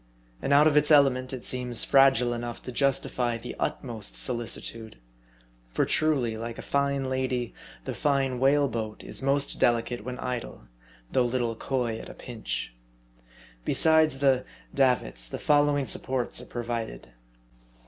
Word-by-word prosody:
And 140 - -2
out 145 +2 +6
of 155 -2 +3
its 150 0 +4
element, 135 -4 +4
it 130 -2 -6
seems 125 -2 +2
fragile 135 -3 +4
enough 120 0 -5
to 125 - -6
justify 125 -2 0
the 120 +2 -8
utmost 115 -5 -3
solici 120 -2 -2
tude. 110 - -7 0.7
For - - 0
truly, 135 -8 +1
like 115 +1 -6
a - - -7
fine 140 -1 0
lady, 130 -2 -2 0.3
the - - -3
fine 135 -4 0
whale 140 +2 +4
boat 110 -3 -5
is - - -2
most 140 +1 +1
delicate 120 -1 +1
when 125 +1 -5
idle, 125 - -5 0.5
though 125 - +2
little 120 -2 -1
coy 120 -2 -2
at - - -10
a - - -10
pinch. - - -5 0.9
Besides 160 - +3
the 135 -2 +3 0.3
"davits," 125 - +1
the - - -5
following 145 -1 +2
supports 130 -2 -1
are 125 - -11
provided. 115 - -5
125 Hz, 150 wpm, -27 LUFS, 120-140 Hz, 0.9 s, out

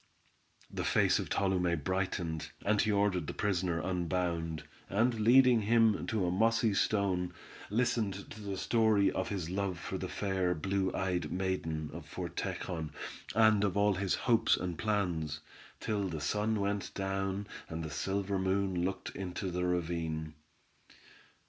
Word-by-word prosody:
The - - -3
face - - +3
of - - -4
Tolume 90 -3 +1
brightened, 95 -4 -2 0.2
and 105 0 +3
he 110 - +2
ordered 100 -5 +1
the - - -4
prisoner 90 -4 0
unbound, 85 -3 -1 0.3
and 115 +3 +2
leading 120 +1 +6
him 110 0 +3
to 105 -4 0
a 90 - +1
mossy 115 +3 +3
stone, 95 -3 +1 0.3
listened 110 -3 0
to 110 - -9
the 100 -2 -4
story 110 -2 +3
of - - -2
his 90 -4 -3
love 95 -2 -1
for - - -5
the - - -3
fair, 95 -3 0
blue 95 +3 0
eyed 90 -5 -1
maiden, 80 -5 -2
of - - -8
Fort - - -6
Tejon, 80 -3 -3 0.5
and 110 -2 +5
of 100 -1 +1
all 100 0 +4
his 95 0 0
hopes 115 -3 +4
and 90 -2 -3
plans, 85 -8 -1 0.4
till 100 -2 -1
the 80 -2 -4
sun 105 +8 0
went 100 0 -1
down 95 0 -2 0.2
and 80 0 -4
the 80 - -5
silver 95 +5 -1
moon 95 -1 0
looked 95 +2 -3
into 95 0 -4
the 90 +1 -1
ravine. 80 -3 -2
95 Hz, 150 wpm, -32 LUFS, 90-105 Hz, 0.5 s, leading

